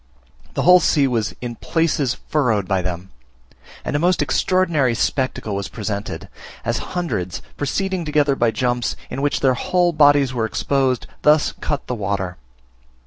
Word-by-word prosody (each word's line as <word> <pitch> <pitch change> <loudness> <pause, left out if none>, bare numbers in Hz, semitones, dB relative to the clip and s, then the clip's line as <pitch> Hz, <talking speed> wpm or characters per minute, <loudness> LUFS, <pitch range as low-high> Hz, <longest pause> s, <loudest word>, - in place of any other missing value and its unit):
The - - 0
whole 180 +1 +8
sea 145 -5 +3
was 115 -4 -1
in 120 -2 -5
places 155 -6 0
furrowed 115 -10 0
by 95 -1 +1
them; 90 +1 -5 0.7
and - - -2
a - - +2
most 175 -2 +2
extraordinary 155 -4 +1
spectacle 130 -4 -1
was 100 -1 -3
presented, 105 -1 -5 0.4
as - - 0 0.2
hundreds, 95 - -3
proceeding 190 +5 -1
together 150 -2 +2
by 120 -3 +2
jumps, 120 -1 -1 0.2
in 135 - -3
which 145 0 0
their 130 -2 +4
whole 175 +7 +1
bodies 145 -3 +4
were 115 -3 0
exposed, 130 +2 0 0.2
thus 150 0 +4
cut 145 -2 -2
the - - -3
water. 95 -4 -3
130 Hz, 150 wpm, -21 LUFS, 110-150 Hz, 0.7 s, whole